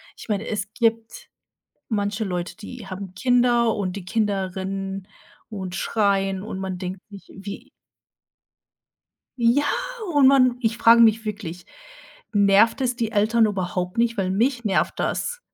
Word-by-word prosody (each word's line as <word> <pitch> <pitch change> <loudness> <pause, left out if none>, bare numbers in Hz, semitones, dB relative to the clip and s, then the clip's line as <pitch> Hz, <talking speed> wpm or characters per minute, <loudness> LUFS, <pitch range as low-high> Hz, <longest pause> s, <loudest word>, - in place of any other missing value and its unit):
Ich - - -12
meine, 210 +2 -1
es 205 -1 -3
gibt 230 - -1 0.6
manche 205 +1 -1
Leute, 180 -2 -4
die 230 0 -10
haben 185 0 -7
Kinder 240 +1 +2
und 190 -1 -3
die 180 -2 -7
Kinder 195 -4 -1
rennen 195 0 -4 0.4
und 190 -4 -6
schreien 195 -2 0
und 210 -3 -6
man 190 -1 -4
denkt 185 +1 -5
sich, 200 -1 -12
wie 195 +1 -8 1.7
Ja 240 +5 +3 0.5
und 285 -2 +6
man 255 -3 +4
ich 225 +1 0
frage 235 +1 +7
mich 225 0 +4
wirklich, 180 -5 -6 0.7
nervt 205 +4 +4
es 250 -2 0
die 230 -2 -2
Eltern 220 +2 +3
überhaupt 180 -1 -3
nicht, 230 0 +2
weil 190 -2 -1
mich 235 +5 0
nervt 200 -3 +1
das. 485 0 -2
210 Hz, 145 wpm, -23 LUFS, 195-235 Hz, 1.7 s, frage